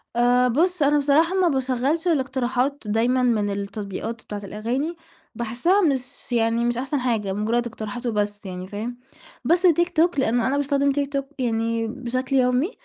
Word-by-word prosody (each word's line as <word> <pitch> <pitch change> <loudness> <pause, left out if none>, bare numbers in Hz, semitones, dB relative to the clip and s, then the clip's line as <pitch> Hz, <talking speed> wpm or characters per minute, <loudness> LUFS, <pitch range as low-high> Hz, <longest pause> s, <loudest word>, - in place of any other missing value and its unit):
آآ, 245 +1 +4
بُص 330 +7 +1
أنا 290 +1 +4
بصراحة 295 +5 +3
ما 375 -2 +3
باشغّلش 270 +3 0
الاقتراحات 265 -2 0
دايمًا 240 +4 +2
من 220 -4 +2
التطبيقات 200 +2 -5
بتاعة 205 -1 -6
الأغاني، 240 - -3 0.4
باحسّها 240 - +1
مش 265 -7 -2
يعني 230 0 +1
مش 240 0 0
أحسن 270 +3 -1
حاجة، 225 -6 -1
مجرَّد 225 +4 0
اقتراحات 230 +1 -6
وبس 205 -2 -1
يعني 185 -1 -6
فاهم، 220 +5 -5 0.5
بس 350 +3 +3
TikTok 345 -1 +2
لأنّه 240 -2 +2
أنا 275 +2 +1
باستخدم 280 0 +1
TikTok 280 0 -1 0.2
يعني 230 -1 0
بشكل 255 +2 -3
يومي، 255 - +2
250 Hz, 150 wpm, -23 LUFS, 225-280 Hz, 0.5 s, آآ